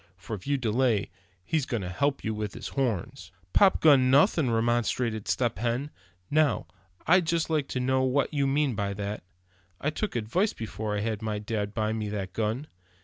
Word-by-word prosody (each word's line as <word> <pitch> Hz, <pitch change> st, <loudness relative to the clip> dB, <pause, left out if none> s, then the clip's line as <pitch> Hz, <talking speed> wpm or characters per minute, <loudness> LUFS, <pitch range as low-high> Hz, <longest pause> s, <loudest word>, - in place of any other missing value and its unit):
For 110 Hz, -, -6 dB
if 95 Hz, -, -11 dB
you 140 Hz, 0 st, +2 dB
delay, 115 Hz, -3 st, +1 dB, 0.3 s
he's 155 Hz, -, 0 dB
going 115 Hz, -7 st, -2 dB
to 90 Hz, -, -4 dB
help 140 Hz, +10 st, 0 dB
you 110 Hz, -, -1 dB
with 105 Hz, -2 st, -4 dB
his -, -, -6 dB
horns." 120 Hz, -10 st, -2 dB, 0.2 s
"Popgun, 150 Hz, -9 st, +5 dB
nothing," 145 Hz, -, +4 dB
remonstrated 115 Hz, -1 st, 0 dB
Step 120 Hz, -2 st, 0 dB
Hen; 120 Hz, +5 st, -1 dB, 0.4 s
"now, 150 Hz, -7 st, +2 dB, 0.4 s
I'd 180 Hz, 0 st, +4 dB
just 165 Hz, -1 st, 0 dB
like 150 Hz, -3 st, +1 dB
to 130 Hz, -, -3 dB
know 130 Hz, +1 st, +2 dB
what 130 Hz, +2 st, +1 dB
you 140 Hz, -2 st, +1 dB
mean 140 Hz, -1 st, +1 dB
by 100 Hz, -1 st, -2 dB
that? 100 Hz, +1 st, -4 dB, 0.6 s
I 150 Hz, -, -1 dB
took 210 Hz, +3 st, -3 dB
advice 145 Hz, -, 0 dB
before 110 Hz, -1 st, -4 dB
I -, -, -1 dB
had 110 Hz, -1 st, -2 dB
my 110 Hz, -1 st, -2 dB
dad 105 Hz, -1 st, -3 dB
buy 110 Hz, -1 st, 0 dB
me 110 Hz, -2 st, -3 dB
that 100 Hz, -3 st, -4 dB
gun. 115 Hz, +6 st, -1 dB
120 Hz, 185 wpm, -28 LUFS, 105-140 Hz, 0.6 s, Popgun